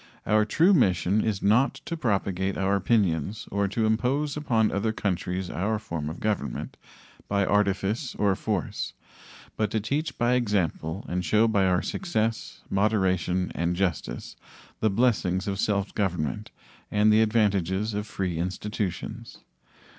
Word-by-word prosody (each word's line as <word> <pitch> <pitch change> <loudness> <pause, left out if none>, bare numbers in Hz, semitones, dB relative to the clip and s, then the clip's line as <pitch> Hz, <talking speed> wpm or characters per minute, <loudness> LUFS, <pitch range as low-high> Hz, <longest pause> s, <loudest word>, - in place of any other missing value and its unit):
Our 105 0 +3
true 170 - +4
mission 100 - +3
is 105 -3 -1
not 110 +7 +3
to 170 - -3
propagate 100 - -1
our 95 +1 +1
opinions 100 -1 0
or 100 0 +1
impose 125 +6 +1
upon 115 -8 +1
other 105 +2 0
countries 95 -3 -2
our 105 +5 -1
form 85 -8 -4
of 80 - -7
government 105 -2 -2 0.5
by 100 -1 +1
artifice 105 +5 0
or 100 -2 +2
force, 90 - -3 0.6
but 110 -1 +1
to 110 - 0
teach 140 +6 -2
by 120 +1 +2
example 100 -6 -1
and 90 +1 -2
show 105 +7 +3
by 100 -4 +2
our 90 -1 +2
success, 115 - -2
moderation, 95 -3 +1
and 85 +1 -1
justice 85 -10 -2 0.4
the 110 - +2
blessings 100 -4 +1
of 100 -1 -2
self 100 -2 0
government 85 - -2 0.4
and 105 +1 +4
the 110 - +5
advantages 105 -2 +1
of 105 +1 -3
free 90 -6 -3
institutions. 105 +4 -4
100 Hz, 140 wpm, -26 LUFS, 95-110 Hz, 0.6 s, the